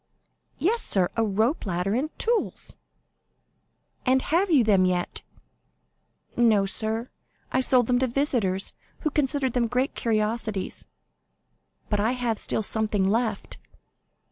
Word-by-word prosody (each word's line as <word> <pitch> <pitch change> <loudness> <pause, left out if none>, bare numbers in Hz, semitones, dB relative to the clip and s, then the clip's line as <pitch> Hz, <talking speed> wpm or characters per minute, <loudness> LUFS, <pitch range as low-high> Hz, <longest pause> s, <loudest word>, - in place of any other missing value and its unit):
"Yes, 455 +7 +1
sir, 185 -3 +1
a 225 - +1
rope 220 - 0
ladder 180 +2 -1
and 270 +7 0
tools." 465 0 -1 1.3
"And 260 0 +2
have 370 +4 +3
you 290 -8 +5
them 200 -4 +4
yet?" 180 -1 -1 1.1
"No, 220 -4 +4
sir; 220 +4 -1 0.4
I 260 - +2
sold 250 -2 +4
them 245 +1 +2
to 260 - +1
visitors, 230 -8 0 0.3
who 310 - -1
considered 275 -3 0
them 240 -2 +1
great 250 +3 0
curiosities; 215 -2 -2 1.0
but 210 - 0
I 220 +4 +1
have 240 -4 -1
still 220 - +1
something 210 -2 0
left." 220 -2 -2
230 Hz, 125 wpm, -25 LUFS, 210-260 Hz, 1.3 s, you